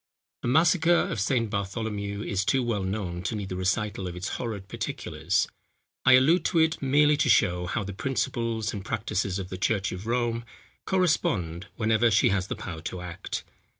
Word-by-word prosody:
The - - -3
massacre 160 +5 +4 0.2
of 115 - -2
St. 115 +2 +1
Bartholomew 100 0 -3
is 100 -4 -1
too 130 +6 +2
well 115 -4 -1
known 95 -2 -3
to 100 +5 -2
need 100 -2 -4
the 90 - -4
recital 95 +1 -1
of 90 - -6
its 90 +1 -4
horrid 105 -6 -4
particulars. - - -1 0.6
I 130 - +8
allude 155 +7 +5
to 170 - +1
it 160 0 +3
merely 145 +2 +4
to - - +2
show 90 -4 +3
how 110 +5 -1
the 100 0 -6
principles 115 -1 -1
and 100 -3 -5
practices 100 -3 -1
of 95 -2 -5
the 95 - -6
church 100 0 +1
of 95 +4 -6
Rome 120 -1 0 0.4
correspond, 140 - 0
whenever 110 +1 +3
she 105 0 +4
has 95 -1 0
the - - -3
power 80 -5 -7
to 90 +2 -5
act. 90 -2 -5
105 Hz, 185 wpm, -27 LUFS, 95-120 Hz, 0.6 s, I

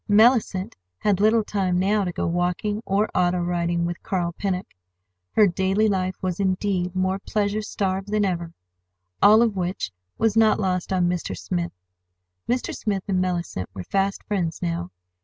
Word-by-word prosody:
Mellicent 215 -3 +4 0.2
had 200 - +1
little 220 +2 +4
time 190 -4 0
now 200 +3 +2
to 180 - -2
go - - -2
walking 180 +5 -1
or 200 +2 +2
auto 180 0 +2
riding 175 -1 0
with 175 0 -4
Carl 175 -3 -1
Pennock. 185 0 -2 0.7
Her 215 - +6
daily 190 +3 +2
life 185 -2 0
was, 185 -1 -2
indeed, 185 -1 0
more 185 +1 0
pleasure 205 +1 -1
starved 195 -2 -2
than 210 0 +1
ever—all 90 - +1
of 225 -4 0
which 180 - -2 0.3
was 225 -2 +2
not 220 -1 +4
lost 185 -3 -1
on 180 -2 +2
Mr. 175 -1 -2
Smith. 175 -2 -3 0.8
Mr. 245 +1 0
Smith 200 -3 -2
and 185 -2 +1
Mellicent 175 - -2
were 95 - -5
fast 195 - -1
friends 175 -6 -2
now. 85 +1 -2
185 Hz, 160 wpm, -24 LUFS, 175-205 Hz, 0.8 s, Her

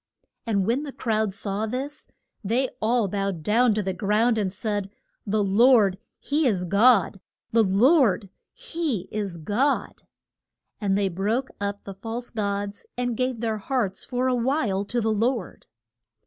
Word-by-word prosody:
And 200 -4 +1
when 235 +6 +1
the 295 -2 -6
crowd 220 -5 -1
saw 200 +2 -3
this 270 +6 -5 0.4
they 245 +6 +1
all 225 0 +2
bowed 195 -4 -2
down 225 +4 +3
to 215 - 0
the 190 0 -2
ground, 220 +4 +2
and 195 -3 -1
said, 205 0 -3 0.4
The 210 +1 +1
Lord 200 -1 +4 0.2
he 295 0 0
is 185 -6 0
God! 200 0 +4 0.3
The 230 - +4
Lord 220 - +3 0.2
he 290 - -3
is 200 -5 -3
God! 210 - -1 0.8
And 195 -2 +1
they 200 -1 +1
broke 210 +8 -1
up 200 0 -3
the 195 - -7
false 225 +5 -6
gods, 205 -1 -3
and 245 -1 -1
gave 255 -1 -1
their 220 -2 -1
hearts 205 -4 -2
for 255 0 -1
a 255 - +2
while 235 -6 0
to 240 +3 -1
the 220 0 +1
Lord. 230 -2 -2
215 Hz, 155 wpm, -25 LUFS, 200-245 Hz, 0.8 s, Lord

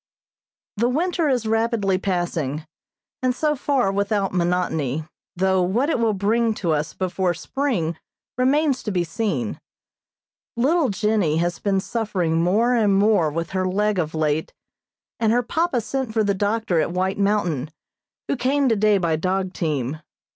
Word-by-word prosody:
The 235 +3 +2
winter 330 +3 0
is 245 -4 0
rapidly 220 -4 +1
passing, 170 -6 -2 0.6
and 255 -1 +1
so 300 +2 +1
far 265 -7 +1
without 200 0 0
monotony, 170 -5 0 0.3
though 190 +1 +2
what 230 - +1
it - - 0
will 225 -2 +2
bring 220 +3 +1
to 175 -5 -1
us 150 0 -1
before 185 -1 -1
spring 180 - -2 0.4
remains 270 +2 +2
to 210 - -3
be 180 -2 +1
seen. 165 - -2 1.0
Little 290 +4 +2
Jennie 205 -6 +1
has 175 +1 -1
been 195 -2 +1
suffering 185 -7 -1
more 220 +8 +3
and 210 -5 +3
more 200 -6 +3
with 165 +2 -4
her 185 -1 0
leg 205 +1 +1
of 160 -2 -2
late, 155 0 0 0.7
and 220 -1 +2
her 245 +2 +2
papa 325 +1 0
sent 260 0 -3
for 220 - +3
the 200 -1 +1
doctor 205 -2 0
at - - -1
White 185 +3 -1
Mountain, 180 -9 0 0.6
who - - 0
came 275 +2 +1
today 215 -3 +3
by 170 -4 +1
dog 185 +2 -1
team. 150 -3 -2
200 Hz, 155 wpm, -22 LUFS, 175-235 Hz, 1.0 s, more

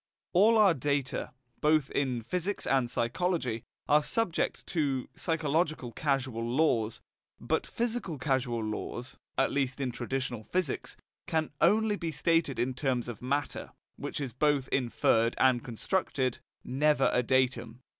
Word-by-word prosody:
All 215 +5 +6
our 205 -5 +6
data, 140 -1 -1 0.3
both 150 -2 +3
in 125 -4 0
physics 180 - -2
and 130 -3 +2
psychology, 125 0 -1 0.3
are 150 +1 +5
subject 180 +2 -1
to 140 -6 -1
psychological 155 -5 0
causal 130 -3 -1
laws; 120 -3 +1 0.4
but - - -1
physical 230 -8 -2
causal 125 -4 0
laws, 120 +3 -5 0.2
at 135 - +3
least 135 -1 -1
in 130 -3 -1
traditional 125 -1 -3
physics, 180 - -2 0.3
can 160 -1 0
only 215 -1 +4
be 165 -3 -3
stated 165 -4 +1
in 130 +2 0
terms 125 -2 -1
of 120 -4 -7
matter, 140 +3 -2 0.2
which - - -4
is 135 -5 -4
both 140 0 +2
inferred 115 -2 +2
and 130 -2 +3
constructed, 130 - -1 0.2
never 145 +1 +2
a 125 - +4
datum. 125 -2 0
135 Hz, 135 wpm, -30 LUFS, 125-160 Hz, 0.4 s, All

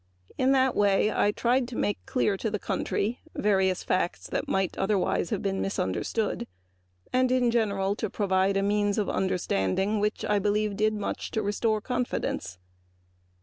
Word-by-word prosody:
I 90 - -41 0.2
think - - -24
that - - 0
in 265 - +5
that 265 -1 +3
way 205 +1 +3
I 205 - +2 0.4
made 205 - 0
clear 210 -6 +1
to 220 +3 -2
the 210 - -2
country 215 +3 -2 0.2
various 190 -3 +1
facts 185 -1 -1
that - - -2
might 190 -2 0
otherwise 195 -3 0
have - - -2
been 195 -1 -1
misunderstood 195 - -2 0.7
and 255 0 +3
in 250 -2 +3
general 200 -4 +1
provided 195 -2 0
a - - 0
means 205 0 +1
of 210 - 0
understanding 185 - 0
which 210 +1 -1 0.5
did 215 +1 +2
much 210 - -3
to 220 - -2
restore 215 +2 0
confidence. 245 - -2
205 Hz, 150 wpm, -27 LUFS, 190-220 Hz, 0.7 s, in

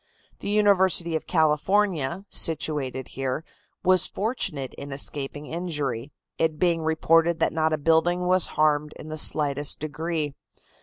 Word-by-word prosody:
The - - -5
University 190 -5 +3
of 160 - -4
California, 170 +1 +1
situated 145 -5 0
here, 135 +4 -3 0.4
was 185 -2 +5
fortunate 195 - -3
in 140 - -9
escaping 140 +1 -4
injury, 150 -7 -3 0.3
it 160 -1 +1
being 170 -1 +1
reported 165 +1 +2
that - - +1
not 160 0 +1
a 155 - +1
building 165 +4 +2
was 185 0 +3
harmed 150 -1 +2
in 155 - -9
the 155 - -5
slightest 145 -2 +1
degree. 155 0 -3
160 Hz, 135 wpm, -25 LUFS, 145-175 Hz, 0.4 s, was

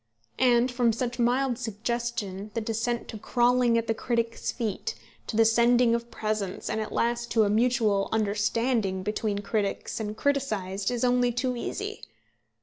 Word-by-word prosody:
And 245 0 +4
from 245 -2 +2
such 240 +2 -3
mild 245 +1 +1
suggestion 225 -3 -3
the - - +1
descent 230 +2 -2
to 220 - -6
crawling 240 +1 +3
at 230 - 0
the 225 - +1
critic's 230 0 -1
feet, 240 - -3 0.3
to 220 - -3
the 225 - +6
sending 235 +1 +4
of 235 0 -2
presents, 215 -4 -3
and 220 - -1
at 215 - -5
last 235 0 0
to 225 -2 +5
a 205 - +1
mutual 220 -3 +2
understanding 215 -1 0
between 210 0 -2
critics 205 0 -2
and 215 -1 -4
criticised, 215 -9 -1
is 245 -1 -2
only 245 0 +3
too 250 +1 -1
easy. 235 - -4
230 Hz, 155 wpm, -27 LUFS, 215-245 Hz, 0.3 s, the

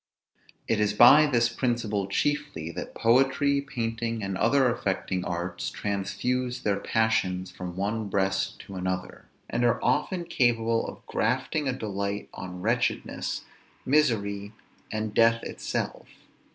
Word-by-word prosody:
It 110 - +1
is 105 0 +1
by 145 +7 +8
this 120 -4 +3
principle 115 -4 -1
chiefly 145 - -1
that - - -7
poetry, 135 +4 +3
painting, 115 -4 -3
and 95 -1 -2
other 135 +6 +3
affecting 95 -6 -1
arts, 85 -7 -3
transfuse 125 - -2
their 100 -1 +1
passions 95 -5 0
from 90 -1 -7
one 105 +2 -2
breast 95 -1 0
to 100 - -11
another, 90 0 -4 0.2
and 120 - -1
are 120 0 +3
often 150 +8 +1
capable 115 -7 +1
of - - -10
grafting 130 +6 0
a - - 0
delight 100 -3 -3
on 90 -1 -7
wretchedness, 120 +2 -1 0.4
misery, 105 -8 +1 0.4
and 110 -1 -3
death 115 +1 +4
itself. - - -4
115 Hz, 125 wpm, -27 LUFS, 100-125 Hz, 0.4 s, by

